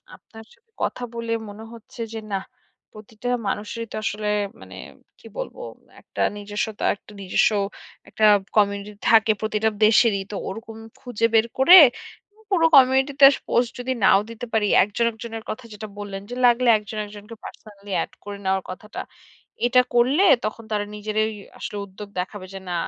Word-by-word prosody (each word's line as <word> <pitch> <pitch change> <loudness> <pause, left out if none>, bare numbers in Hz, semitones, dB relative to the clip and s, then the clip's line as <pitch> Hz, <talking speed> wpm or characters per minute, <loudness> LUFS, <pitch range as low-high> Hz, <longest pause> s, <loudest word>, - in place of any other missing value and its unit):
আপনার 225 0 -15
সাথে 460 - -30
কথা - - -2
বলে 230 -1 -5 0.2
মনে 210 +2 -10
হচ্ছে 230 +1 -11
যে 225 - -4
নাহ, 190 -1 -2 0.5
প্রতিটা 215 +2 -10 0.2
মানুষেরই 215 +3 -4
তো - - -6
আসলে 210 -1 -3 0.3
মানে - - -12 0.4
কী - - -21
বলব, - - -5 0.5
একটা - - -7 0.2
নিজস্বতা 205 +1 -4
একটা 210 - -19
নিজস্ব 190 +3 +2 0.6
একটা 215 - +1 0.3
কমিউনিটি 200 0 +1 0.2
থাকে 220 -1 +5
প্রতিটা 215 0 0 0.2
দেশেরই। 215 -2 +4
তো - - -5
ওরকম 225 +3 -8 0.2
খুঁজে 235 -3 -2
বের 225 0 +5
করে 275 +8 +8 0.7
পুরো 345 -4 +3
কমিউনিটিতে 265 +1 +5 0.2
পোস্ট 240 -1 +1
যদি 250 +1 -3
নাও 195 - +6
দিতে 230 +1 -7
পারি, 220 -2 +2 0.2
একজন 210 +4 -1
একজনের 225 0 -8
কথা 235 +3 -6
যেটা 215 +1 -8
বল্লেন, 200 -1 -6
যে - - -4
লাগলে 240 0 +4
একজন 210 +1 -8
একজনকে 210 +2 -11
পার্সোনালি 205 -1 -12
এড - - -11
করে 205 0 -7
নেওয়ার 190 0 0
কথাটা। 210 +3 -8 0.7
এটা 250 +1 +5
করলে 260 +10 +3 0.2
তখন 220 +1 -4
তারা 205 -1 -1
নিজেরাই 215 +1 -1 0.3
আসলে 210 - -5
উদ্যোগ 200 +1 -11
দেখাবে 185 +1 -5
যে 195 - -6
না - - -2
220 Hz, 155 wpm, -23 LUFS, 205-235 Hz, 0.7 s, করে